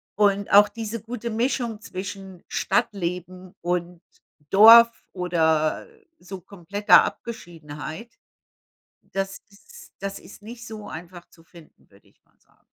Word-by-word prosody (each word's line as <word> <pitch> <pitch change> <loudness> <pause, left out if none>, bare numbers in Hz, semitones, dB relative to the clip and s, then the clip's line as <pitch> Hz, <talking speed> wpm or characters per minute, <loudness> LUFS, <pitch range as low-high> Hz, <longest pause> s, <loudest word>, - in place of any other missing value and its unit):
Und 200 -1 +1
auch 205 +1 +7
diese 225 +1 -6
gute 235 +1 -6
Mischung 235 -1 -1
zwischen 190 -2 -8
Stadtleben 180 -1 -3
und 175 0 -3 0.5
Dorf 230 +3 +9 0.2
oder 160 -4 0 0.3
so 190 +1 -9
kompletter 200 +2 +3
Abgeschiedenheit, 165 -2 -8 1.0
das 195 0 -3
ist 475 - -17
das 195 0 -5
ist - - -15
nicht 235 +2 -10
so 215 -2 -9
einfach 175 +1 -10
zu 165 - -21
finden, 165 -1 -19
würde 100 0 -24
ich - - -32
mal - - -38
sagen. - - -34
195 Hz, 120 wpm, -24 LUFS, 175-220 Hz, 1.0 s, Dorf